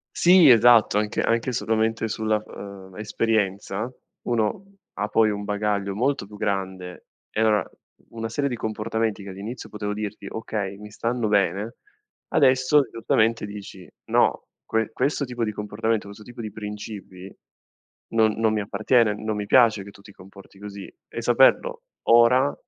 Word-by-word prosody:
Sì, 175 -4 +7
esatto, 120 -3 +6
anche 105 0 0
anche 115 +2 0
solamente 110 0 0
sulla, 110 0 -1
ehm 95 -2 -11
esperienza, 105 0 -1 0.3
uno 120 - -1 0.3
ha 105 +1 -2
poi 110 +1 +3
un 105 -1 -4
bagaglio 100 -1 -1
molto 130 0 0
più 105 - -12
grande 95 -3 -4 0.2
e - - -4
avrà 110 -2 +3 0.4
una 115 0 -5
serie 140 +5 -1
di 120 - -4
comportamenti 110 -1 -2
che 100 - -9
all'inizio 100 +6 -7
potevo 105 -1 -4
dirti: 105 0 -6
"Okay, 105 -3 -4
mi 105 0 -11
stanno 115 0 -2
bene," 100 +2 +1 0.6
adesso 130 +3 +4
giustamente 115 -1 +1
dici: 100 -3 -10 0.2
"No, - - +2 0.2
que 110 0 -1
questo 140 +5 0
tipo 120 -3 -3
di 110 - -3
comportamento, 105 +1 -2
questo 100 +1 -11
tipo 120 -1 -9
di 110 -2 -6
principi 105 -3 -8 0.8
non 110 -1 +3
non 110 0 +1
mi 105 - 0
appartiene, 105 +2 +2
non 110 0 -3
mi 105 - -3
piace 115 -5 +5
che 100 - -11
tu 100 - -18
ti 100 - -15
comporti 95 0 -16
così." 100 -1 -9
E 115 - -6
saperlo 295 - +3 0.3
ora, 125 +4 +5
110 Hz, 155 wpm, -24 LUFS, 100-115 Hz, 0.8 s, Sì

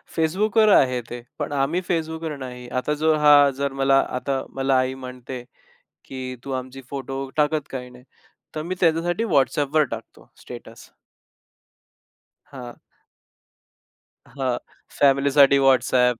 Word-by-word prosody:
Facebookवर 210 +7 +2
आहे 125 -2 +3
ते 120 0 -7 0.2
पण - - -3
आम्ही 145 +6 0
Facebookवर 160 -2 -2
नाही. 125 -1 -8
आता 130 +4 -1
जो 160 -1 +4
हा 150 - +8 0.3
जर, 140 -1 -1
मला 135 0 +4 0.2
आता 135 0 -2 0.2
मला 135 0 +1
आई 130 0 0
म्हणते, 125 0 -8 0.6
की 130 -1 -7
"तू 135 - -5
आमची 130 +1 -11
फोटो 135 -1 -5 0.2
टाकत 150 0 0
काही 125 -1 -6
नाही?" 125 0 -16 0.5
तर 155 - -3
मी 180 +3 -4
त्यांच्यासाठी 175 +5 +1
WhatsApp 140 +2 +1
वर 155 -1 +5
टाकतो 115 0 -13
स्टेटस - - -11 1.6
हां. 125 -3 -9 1.6
हां 135 -2 -1 0.5
फॅमिलीसाठी 140 0 +5
WhatsApp. 125 -1 +3
135 Hz, 125 wpm, -23 LUFS, 130-155 Hz, 1.6 s, हा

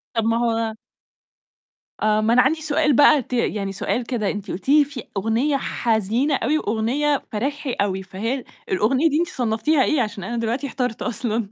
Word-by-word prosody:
طَب 225 - +1
ما 230 0 +2
هو 230 -2 0 1.3
آه، 215 0 +2
ما 225 +2 +2
أنا 250 - +6
عندي 315 +4 +1
سؤال 300 -2 +2
بقى 290 0 +6
ت 250 - -10
يعني 210 -4 -1
سؤال 235 +5 -2
كدا 230 -5 -1
أنتِ 205 -1 -6
قُلتِ 195 +9 -6
لي 295 0 +6
في 275 -4 -8
أغنية 235 +8 +1
حزينة 235 +4 0
أوي 305 +4 +1
وأغنية 265 +6 0
فرايحي 275 +5 -2
أوي، 190 -1 -1
فهل 225 +8 -3 0.3
الأغنية 255 - +2
دي 300 +3 +1
أنتِ 345 - +1
صنّفتيها 245 +4 +1
إيه 300 -5 +2
عشان 210 -4 -4
أنا 235 +3 -4
دلوقتي 235 +5 -1
احترت 250 -4 -3
أصلًا؟ 230 -3 -2
235 Hz, 175 wpm, -22 LUFS, 220-280 Hz, 1.3 s, أنا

